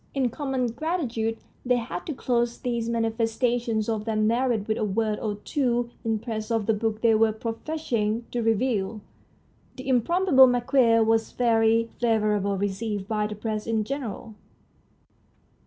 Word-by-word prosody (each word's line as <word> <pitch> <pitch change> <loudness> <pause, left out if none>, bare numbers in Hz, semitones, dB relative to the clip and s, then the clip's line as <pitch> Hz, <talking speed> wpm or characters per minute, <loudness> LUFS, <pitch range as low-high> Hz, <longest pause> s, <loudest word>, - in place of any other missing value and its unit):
In 260 -3 +1
common 270 -2 -2
gratitude 240 -7 -2 0.3
they 250 0 +2
had 245 +9 -4
to 310 - -2
close 240 -2 0
these 235 -2 -2
manifesta 230 +1 0
tions 220 -2 -1
of 220 -2 -2
their 225 -1 -1
merit 225 0 +1
with 220 0 -1
a - - 0
word 215 +1 0
or 210 -2 -2
two 240 +1 -1
in 225 -1 0
praise 215 0 -5
of 225 -3 0
the 225 - +2
book 220 0 -2
they 230 -1 +4
were 220 0 +4
professing 230 -1 -2
to 240 - -1
review. 225 -2 0 0.7
"The 260 - -9
Improbable 265 - +5
Marquis 245 -2 +3
"was 225 0 +1
very 230 -1 +2
favourably 210 -4 +1
received 205 0 -3
by 210 -1 0
the 210 - -6
Press 215 0 -4
in 220 -1 +1
general. 230 -3 -5
225 Hz, 155 wpm, -25 LUFS, 215-245 Hz, 0.7 s, Improbable